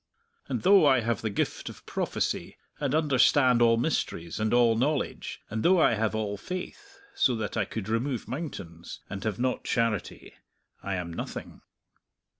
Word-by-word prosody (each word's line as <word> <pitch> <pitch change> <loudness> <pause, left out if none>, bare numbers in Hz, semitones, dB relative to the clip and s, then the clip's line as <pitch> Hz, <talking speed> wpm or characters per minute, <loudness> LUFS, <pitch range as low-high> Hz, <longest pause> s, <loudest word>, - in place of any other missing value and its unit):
_ - - -1
"_'And - - -3
though 195 0 +7
I 130 -3 +5
have 115 -2 -1
the 110 - -1
gift 100 - -2
of - - -13
prophecy, - - -2 0.2
and 145 -1 0
understand 130 -4 +4
all 115 -1 +5
mysteries, 95 - -2
and 110 0 0
all 120 -2 +4
knowledge; 140 +5 -1
and 110 +1 -2
though 180 +5 +4
I 155 - +5
have 110 0 0
all 105 -2 -2
faith, 185 - -7 0.2
so 125 - +2
that 110 -2 -4
I 110 -3 +1
could 110 -1 -5
remove 115 +3 -1
mountains, 105 - -7
and 100 0 -5
have 105 -3 -2
not 125 +1 -1
charity, 115 -4 -2 0.5
I 100 -1 -3
am 85 -2 -4
nothing.' - - -7
115 Hz, 170 wpm, -28 LUFS, 105-140 Hz, 0.5 s, though